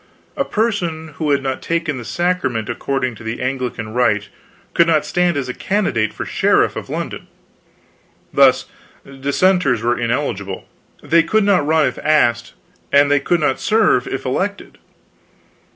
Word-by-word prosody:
A 275 - 0
person 185 - -2
who 155 -2 -1
had 140 -1 +2
not 135 -1 -3
taken 165 -5 -2
the - - -7
Sacrament 130 -8 -1
according 130 +1 -2
to 110 - -12
the 115 +1 -4
Anglican 125 -4 -3
rite 105 -4 +1 0.4
could 170 - +4
not 155 -3 +2
stand 175 -3 +1
as 135 -2 -2
a 125 - -4
candidate 125 - 0
for - - -6
sheriff - - +2
of - - -7
London. - - -5 1.1
Thus - - +5 0.4
Dissenters 140 - +1
were 120 +1 +1
ineligible; 115 -6 -3 0.4
they 170 0 +4
could 215 +6 +1
not 190 -7 +2
run 155 -1 +3
if - - -3
asked, 120 -7 +1 0.4
they 145 0 +4
could 170 +4 0
not 140 -3 +1
serve 215 - +2
if 135 - -4
elected. 195 +10 -3
140 Hz, 150 wpm, -18 LUFS, 125-170 Hz, 1.1 s, Thus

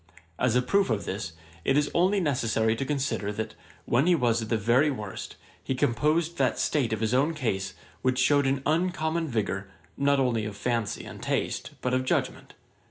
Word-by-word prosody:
As 125 -2 +2
a 125 - +3
proof 195 +9 +2
of 110 -4 -1
this, 95 -3 -4 0.3
it 135 - +2
is 145 0 +1
only 185 +4 +3
necessary 115 - +1
to 135 - -3
consider, 135 -7 -1
that, 110 +1 -4 0.3
when 135 +7 +2
he 180 - +5
was 120 -5 +2
at 110 - -5
the 115 - +2
very 120 +8 +3
worst, 105 -8 -5 0.3
he 135 - -1
composed 155 +8 +1
that 130 -2 +2
state 135 -7 +1
of 110 -1 -2
his 110 +1 +1
own 145 +6 +2
case, 100 -9 -2 0.3
which 130 0 +1
shewed 140 +2 +4
an 135 0 0
uncommon 165 0 0
vigour, 100 -6 -2 0.3
not 140 0 +3
only 120 -4 +1
of 105 -1 -6
fancy 115 -2 -2
and - - -9
taste, - - -2
but 125 - -1
of 130 0 +2
judgement. 130 - -2
130 Hz, 190 wpm, -27 LUFS, 110-150 Hz, 0.3 s, he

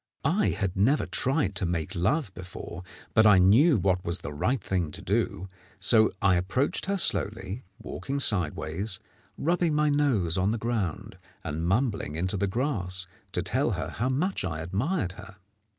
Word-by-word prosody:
] - - -16 0.2
I - - +3
had 95 -3 -2
never 120 +10 +3
tried 130 - 0
to 95 - 0
make 85 +1 -2
love 105 - 0
before, 90 -1 -8 0.3
but 110 -1 +6
I 105 -2 +7
knew 115 - +6
what 95 -1 +1
was 85 +1 -2
the 75 - -6
right 125 - 0
thing 90 -4 -1
to - - -6
do; 95 0 -1 0.3
so 110 +3 +5
I 95 -2 +5
approached 125 - -1
her 200 0 0
slowly, 110 - -1
walking 140 +1 -4
sideways, 90 - 0 0.4
rubbing 170 0 +1
my 150 0 +3
nose 110 - +2
on 95 +2 +2
the 115 - 0
ground, 110 -7 -3 0.2
and 80 +3 -3
mumbling 100 - 0
into 90 +4 0
the 100 +1 0
grass 95 -6 -2 0.3
to - - -1
tell - - +1
her - - -3
how 125 +4 -2
much 165 - 0
I 80 -3 -3
admired 100 - -1
her. 95 +1 -12
100 Hz, 170 wpm, -27 LUFS, 90-130 Hz, 0.4 s, I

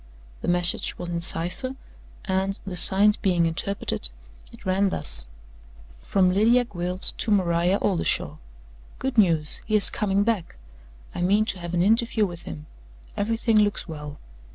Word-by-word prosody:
The - - -5
message 175 0 +1
was 175 - -6
in 170 -1 -3
cipher, 180 +11 -2 0.5
and, 190 0 -1
the 190 -2 -6
signs 205 +4 +3
being 180 -5 +1
interpreted, 170 +4 -2 0.4
it - - -16
ran 190 +1 +1
thus: 60 - +2 0.7
"From 185 -2 +1
Lydia 235 +5 +3
Gwilt 180 -3 -4
to - - -1
Maria 180 -2 +2
Oldershaw. 195 -5 0 0.6
Good 260 -3 -1
news! 165 -6 +3
He 215 - 0
is 210 - +9
coming 200 -1 0
back. 215 -6 -2 0.6
I - - -5
mean 200 +4 +2
to 195 -4 -3
have 175 0 -5
an 175 - +2
interview 225 +1 +2
with 175 -3 -8
him. 75 -1 -8 0.5
Everything 225 +1 +1
looks 205 -1 0
well. 150 -2 -8
190 Hz, 150 wpm, -24 LUFS, 175-210 Hz, 0.7 s, is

